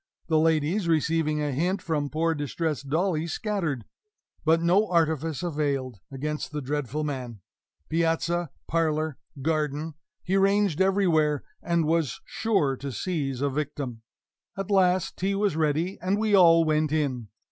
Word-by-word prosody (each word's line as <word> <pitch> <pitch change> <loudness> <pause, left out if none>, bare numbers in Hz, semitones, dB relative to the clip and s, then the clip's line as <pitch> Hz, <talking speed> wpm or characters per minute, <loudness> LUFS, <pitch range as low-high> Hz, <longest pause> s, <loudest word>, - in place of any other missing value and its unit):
The 160 -1 +4
ladies, 160 +4 +2
receiving 155 -1 +1
a 145 - -1
hint 175 +9 0
from 150 -3 -2
poor 165 +2 +1
distressed 145 -1 -3
Dolly, 165 +1 0
scattered. 170 - -2 0.6
But 160 +1 +4
no 180 +6 +3
artifice 160 -2 0
availed 140 - -2
against 150 +4 -4
the 150 - -3
dreadful 145 +1 -2
man. 125 -7 -5 0.5
Piazza, 170 +1 0 0.2
parlor, 155 -2 0 0.2
garden 155 0 -1 0.3
he 190 +2 +1
ranged 195 -3 +2
everywhere, 170 -7 +2 0.2
and 170 -2 +1
was 160 -6 0
sure 195 -12 0
to 140 +1 -5
seize 135 - -2
a 140 - +2
victim. 140 -5 -4 0.6
At 195 +1 -4
last 185 -2 +2
tea 195 +2 0
was 200 -4 +1
ready, 160 +4 0
and 185 +3 +1
we 215 0 0
all 165 -4 +7
went 155 -1 +1
in. 135 -7 -1
160 Hz, 140 wpm, -26 LUFS, 145-175 Hz, 0.6 s, all